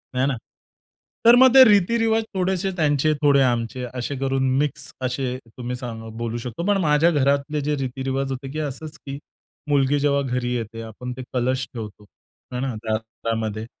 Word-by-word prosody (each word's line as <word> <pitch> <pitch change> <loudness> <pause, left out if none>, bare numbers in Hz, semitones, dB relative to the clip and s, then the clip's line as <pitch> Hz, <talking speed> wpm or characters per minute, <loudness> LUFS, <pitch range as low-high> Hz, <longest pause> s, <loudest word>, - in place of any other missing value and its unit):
आहे 130 +1 +2
ना. 135 - 0 0.9
तर 235 +1 +9
मग 260 0 +7
ते 265 - +11
रीती-रिवाज 225 +2 +3
थोडेसे 190 +1 0
त्यांचे, 155 -1 +2
थोडे 140 -2 +5
आमचे 120 0 0
असे 130 +3 -3
करून, 135 -1 +1
मिक्स 145 -2 -2
असे 130 0 -2 0.2
तुम्ही 125 0 -4
सा 125 -1 -6 0.3
बोलू 115 0 -3
शकतो. 125 +7 -5
पण 205 - +3
माझ्या 150 +2 +4
घरातले 140 0 +1
जे 150 +1 0
रीती-रिवाज 135 +1 -2
होते, 135 +1 -5
की 155 - -4
असंच 155 +2 -5
की 140 0 -5 0.5
मुलगी 145 0 +3
जेव्हा 140 0 +2
घरी 125 -2 -2
येते, 115 -1 -5
आपण 115 +3 -7
ते 130 - -5
कलश 130 +1 0
ठेवतो 105 -3 -8 0.5
आहे 125 0 -3
ना, 135 -2 -2
दारामध्ये 110 0 -3
135 Hz, 165 wpm, -23 LUFS, 125-150 Hz, 0.9 s, ते